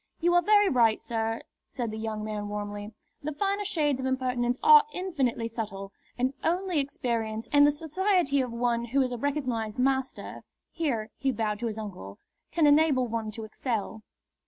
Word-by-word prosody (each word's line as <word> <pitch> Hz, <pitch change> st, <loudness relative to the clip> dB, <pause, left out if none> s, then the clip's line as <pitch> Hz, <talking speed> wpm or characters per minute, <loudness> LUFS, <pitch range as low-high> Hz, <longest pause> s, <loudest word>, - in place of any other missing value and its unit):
"You 350 Hz, +1 st, +2 dB
are 350 Hz, -, +5 dB
very 415 Hz, +2 st, +5 dB
right, 235 Hz, -, +3 dB
sir," 225 Hz, -1 st, -2 dB, 0.3 s
said 235 Hz, -3 st, -3 dB
the 220 Hz, -, -5 dB
young 220 Hz, -1 st, -3 dB
man, 210 Hz, -1 st, -4 dB
warmly. 205 Hz, 0 st, -5 dB, 0.3 s
"The 305 Hz, +1 st, -4 dB
finer 400 Hz, +4 st, 0 dB
shades 300 Hz, -9 st, 0 dB
of 260 Hz, -, -1 dB
impertinence 250 Hz, -2 st, 0 dB
are 450 Hz, -1 st, +9 dB
infinitely 275 Hz, -, -1 dB
subtle, 205 Hz, -4 st, -5 dB, 0.3 s
and 255 Hz, +2 st, 0 dB
only 355 Hz, 0 st, +1 dB
experience 230 Hz, -5 st, -2 dB
and 290 Hz, 0 st, +7 dB
the -, -, +5 dB
society 320 Hz, -1 st, +1 dB
of 250 Hz, -2 st, -3 dB
one 235 Hz, 0 st, 0 dB
who 265 Hz, +4 st, +1 dB
is 255 Hz, -, -2 dB
a 245 Hz, -, -3 dB
recognised 255 Hz, -6 st, -2 dB
master" 265 Hz, +1 st, -1 dB, 0.3 s
here 235 Hz, -10 st, -2 dB
he 270 Hz, -1 st, +1 dB
bowed 210 Hz, -3 st, -2 dB
to 240 Hz, -, -2 dB
his 220 Hz, -1 st, -4 dB
uncle 180 Hz, -, -7 dB, 0.3 s
"can 325 Hz, -1 st, +3 dB
enable 290 Hz, -3 st, +4 dB
one 225 Hz, -1 st, -3 dB
to 220 Hz, +1 st, -7 dB
excel." 220 Hz, -1 st, -3 dB
250 Hz, 175 wpm, -28 LUFS, 220-295 Hz, 0.3 s, are